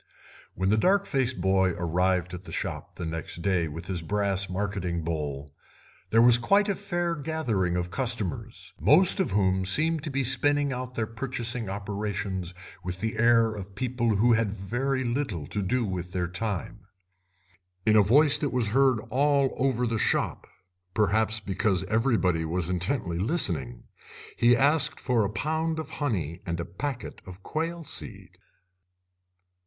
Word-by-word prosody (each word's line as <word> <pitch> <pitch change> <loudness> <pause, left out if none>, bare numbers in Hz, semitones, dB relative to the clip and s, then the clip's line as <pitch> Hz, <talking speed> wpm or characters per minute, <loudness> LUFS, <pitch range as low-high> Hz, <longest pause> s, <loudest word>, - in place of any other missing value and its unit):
When 95 +2 0
the 110 +1 +3
dark 200 - +3
faced 130 -5 -1
boy 95 0 +2
arrived 90 +1 0
at 90 +1 -8
the - - -9
shop - - -5
next 80 0 -4
day 90 -4 +1
with 80 +3 -7
his 90 -3 -3
brass 100 +2 -1
marketing 90 -3 -2
bowl 75 -3 -4 0.6
there 115 +1 +5
was 120 -1 +7
quite 200 - +3
a 200 - +1
fair 175 -3 -2
gathering 125 - -1
of 90 0 -3
customers, 115 -4 -3
most 180 +7 +5
of 190 - +1
whom 95 -1 +1
seemed 155 - +2
to 155 - -3
be 140 -1 -1
spinning 145 +2 +2
out 125 0 -6
their 110 - 0
purchasing 120 -1 -2
operations 100 -3 -4 0.3
with 90 0 -5
the 110 +2 -3
air 115 -1 +4
of 100 -2 -8
people 120 -2 0
who 120 +4 +4
had 115 -3 +1
very 120 +7 -2
little 120 - -2
to 105 +7 -3
do 120 +5 0
with 90 -2 -5
their 90 -1 -1
time. 95 +1 -5 1.0
In 110 - +4
a 105 - +7
voice 140 +9 +5
that 145 - -1
was 125 -5 0
heard 130 0 +3
all 140 +1 +2
over 130 -2 +1
the 115 -2 -1
shop, - - -1 0.5
perhaps 110 +2 +2
because 95 -2 0
everybody 105 -6 +1
was 85 +2 -2
intently 90 -1 -1
listening, 80 - +1 0.5
he 120 0 +4
asked 145 +2 +2
for 125 -4 +1
a 100 - -1
pound 160 +7 -1
of 155 -1 -6
honey 90 - -2
and 85 0 -2
a 85 - -3
packet 120 +8 -6
of 95 +1 -11
quail 165 +2 -3
seed. - - -6
110 Hz, 160 wpm, -27 LUFS, 90-130 Hz, 1.0 s, was